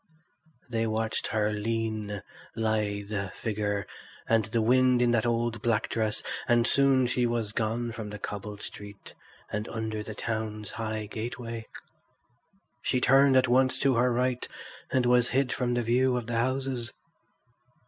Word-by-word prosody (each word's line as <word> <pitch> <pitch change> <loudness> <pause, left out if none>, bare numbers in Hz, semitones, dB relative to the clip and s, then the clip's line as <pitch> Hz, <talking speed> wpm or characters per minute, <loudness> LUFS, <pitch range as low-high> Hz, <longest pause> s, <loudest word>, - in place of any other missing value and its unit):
They 115 -2 0
watched 110 0 -1
her 105 -1 +1
lean, 110 -1 -2 0.3
lithe 105 -2 -1 0.2
figure, 105 -2 -2 0.4
and 115 -2 +3
the 110 +1 0
wind 125 +1 +4
in 120 -1 +3
that 120 0 +2
old 115 -1 0
black 115 -2 +1
dress, 110 -1 -1 0.2
and 120 -1 +4
soon 135 -1 +4
she 120 0 +1
was 115 -3 -1
gone 115 +2 -1
from 110 -2 -6
the 105 - -6
cobbled 105 0 -6
street 100 -1 -9 0.4
and 105 +1 -2
under 110 -1 -3
the 105 0 -7
town's 110 -2 -3
high 110 -1 -3
gateway. 115 +1 -5 1.1
She 125 - +1
turned 135 +1 +5
at 130 0 +4
once 130 +2 +3
to 135 -1 +4
her 125 +1 +3
right 125 +1 0 0.4
and 130 -1 +2
was 125 0 +4
hid 130 -1 +1
from 120 -1 0
the 120 - +1
view 125 +2 +2
of 120 - -3
the 120 0 -2
houses. 130 -1 -1
115 Hz, 150 wpm, -28 LUFS, 110-125 Hz, 1.1 s, turned